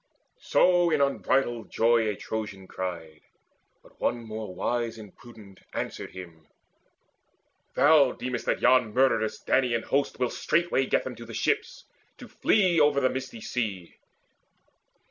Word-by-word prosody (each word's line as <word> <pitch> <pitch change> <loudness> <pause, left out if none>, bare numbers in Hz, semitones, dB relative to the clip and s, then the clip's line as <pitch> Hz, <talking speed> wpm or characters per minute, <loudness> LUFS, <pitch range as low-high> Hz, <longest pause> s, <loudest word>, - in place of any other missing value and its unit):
So 175 - +3
in 155 -2 +1
unbridled 130 -4 0
joy 115 -1 +2
a 105 - -2
Trojan 105 -4 -6
cried; 85 -4 -6 0.6
But - - -22
one - - +1
more 110 -4 -7
wise 115 +2 -2
and 105 -3 -12
prudent 105 -5 -15 0.2
answered - - -4
him: 85 -4 -12 1.3
"Thou 145 -3 +5
deemest 125 -2 -5
that - - 0
yon 125 -4 +3
murderous 130 -4 +1
Danaan 120 -3 +1
host 140 +1 -1
Will 125 -1 -1
straightway 170 -5 0
get - - +1
them 130 - -6
to 115 - -9
the 115 - -8
ships, - - -1 0.3
to - - -11
flee 185 -6 +2
Over 145 -2 +4
the 130 -2 +2
misty 130 -3 -6
sea. 100 -9 -4
120 Hz, 140 wpm, -27 LUFS, 105-135 Hz, 1.3 s, Thou